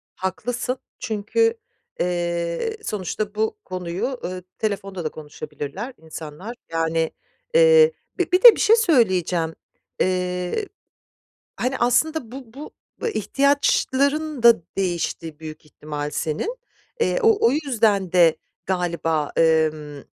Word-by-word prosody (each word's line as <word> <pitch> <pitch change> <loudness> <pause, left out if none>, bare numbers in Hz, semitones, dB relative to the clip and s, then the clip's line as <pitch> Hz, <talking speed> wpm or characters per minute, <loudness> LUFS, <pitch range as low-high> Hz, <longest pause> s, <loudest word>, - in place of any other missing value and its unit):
Haklısın 240 +7 -3 0.2
çünkü, 225 - +1 0.5
eee, 175 - -1
sonuçta 210 +1 -3
bu 220 +1 -1
konuyu, 185 +8 -4
eee, 180 0 -5
telefonda 195 -4 -3
da 155 - -1
konuşabilirler 155 - -7
insanlar, 160 +7 -8 0.2
yani, 165 0 0 0.4
eee 480 -1 +7 0.3
Bir 360 +1 +2
de 475 -2 +11
bir - - -7
şey 445 - +6
söyleyeceğim, 185 - +2 0.4
eee, 180 - -1 0.9
hani, 255 +2 -1
aslında 245 +1 +1
bu 255 -3 -10
bu 290 +4 -9 0.4
ihtiyaçların 280 - +1
da 235 -6 +7 0.2
değişti 170 -4 -2
büyük 155 0 -9
ihtimal 150 -1 -6
senin, 160 - -2 0.4
eee, 465 - +1
o 440 - +4
o - - +3
yüzden 225 - +1
de 170 -3 +5 0.3
galiba, 170 -4 -1
emm, 155 -2 +2
190 Hz, 105 wpm, -22 LUFS, 165-265 Hz, 0.9 s, de